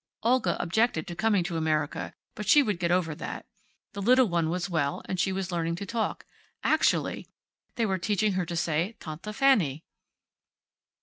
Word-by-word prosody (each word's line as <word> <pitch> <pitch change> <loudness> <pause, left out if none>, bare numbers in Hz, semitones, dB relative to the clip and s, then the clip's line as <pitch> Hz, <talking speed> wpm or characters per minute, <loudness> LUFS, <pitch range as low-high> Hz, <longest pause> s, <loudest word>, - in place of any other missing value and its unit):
Olga 245 +1 +2
objected 220 +8 +1
to 175 -3 -7
coming 210 -2 +2
to 170 -1 -3
America, 155 -2 -1 0.2
but 210 - -6
she 295 +5 +7
would 210 -8 -1
get 170 -1 0
over 175 -3 +1
that. - - -6 0.5
The 200 - -5
little 255 +5 +5
one 170 -5 0
was 180 +1 -1
well, 155 -6 -1
and 185 - -3
she 190 - +2
was 190 -1 -3
learning 170 -1 -1
to 200 - -6
talk. 225 +2 -2 0.4
Actually! - - +1 0.5
They 230 - +1
were 190 -3 0
teaching 205 +3 +1
her 185 -2 -1
to 170 - -4
say 170 +5 0
Tante 160 +6 -7
Fanny. 205 - +2
185 Hz, 175 wpm, -28 LUFS, 170-215 Hz, 0.5 s, she